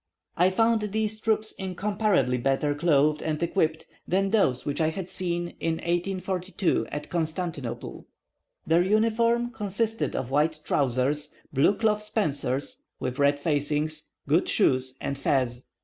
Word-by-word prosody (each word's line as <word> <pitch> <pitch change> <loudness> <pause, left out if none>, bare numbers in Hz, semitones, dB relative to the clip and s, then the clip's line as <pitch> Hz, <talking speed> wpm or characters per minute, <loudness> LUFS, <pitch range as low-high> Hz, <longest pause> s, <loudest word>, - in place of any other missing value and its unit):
I 180 +2 +4
found 225 +3 +2
these 215 +1 -1
troops 220 0 0
incomparably 195 - 0
better 135 +3 +1
clothed 150 -1 +2
and 155 -1 -1
equipped 160 -2 0 0.2
than 195 +2 +1
those 130 - +2
which 145 +3 -1
I 155 - +3
had 175 +2 -5
seen, 175 -2 -2
in 165 -1 0
1842, 185 +2 -1
at 145 - -5
Constantinople. 160 -7 -4 0.6
Their 165 +2 +4
uniform 230 +4 +2
consisted 220 +1 -1
of 130 - -3
white 155 +2 +2
trousers, 140 +3 0 0.2
blue 140 +9 +4
cloth 210 -1 +1
spencers, 155 - -2 0.2
with 130 +2 -3
red 145 0 +3
facings, 150 +1 -1 0.2
good 155 +5 +2
shoes, 130 -9 +2
and 140 0 -3
fez. 130 -3 0
165 Hz, 135 wpm, -26 LUFS, 145-205 Hz, 0.6 s, I